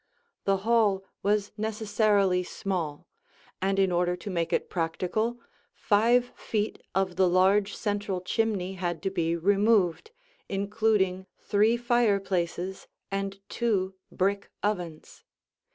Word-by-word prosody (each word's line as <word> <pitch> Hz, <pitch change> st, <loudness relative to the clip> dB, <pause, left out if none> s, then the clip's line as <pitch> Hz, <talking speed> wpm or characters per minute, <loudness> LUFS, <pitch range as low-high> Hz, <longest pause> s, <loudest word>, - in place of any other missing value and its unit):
The 195 Hz, 0 st, +3 dB
hall 215 Hz, -5 st, +3 dB, 0.2 s
was 205 Hz, 0 st, +1 dB
necessarily 210 Hz, -3 st, +2 dB
small, 175 Hz, -5 st, -4 dB, 0.5 s
and 195 Hz, +1 st, +1 dB
in 190 Hz, -1 st, +3 dB
order 175 Hz, 0 st, +1 dB
to 180 Hz, +3 st, -7 dB
make 170 Hz, -2 st, -1 dB
it -, -, 0 dB
practical, 185 Hz, +8 st, -1 dB, 0.4 s
five 235 Hz, +4 st, +3 dB
feet 215 Hz, -1 st, -2 dB
of 190 Hz, -2 st, 0 dB
the 190 Hz, -1 st, +4 dB
large 195 Hz, +3 st, +3 dB
central 205 Hz, -3 st, -2 dB
chimney 195 Hz, 0 st, -1 dB
had 175 Hz, -3 st, -3 dB
to 195 Hz, -, 0 dB
be 170 Hz, -3 st, 0 dB
removed, 200 Hz, -, +2 dB, 0.4 s
including 200 Hz, -2 st, +1 dB
three 215 Hz, +3 st, +2 dB
fireplaces 195 Hz, -6 st, 0 dB, 0.2 s
and 195 Hz, 0 st, -3 dB
two 195 Hz, -5 st, 0 dB, 0.2 s
brick 200 Hz, +2 st, 0 dB
ovens. 175 Hz, -7 st, -3 dB
195 Hz, 115 wpm, -28 LUFS, 180-210 Hz, 0.5 s, the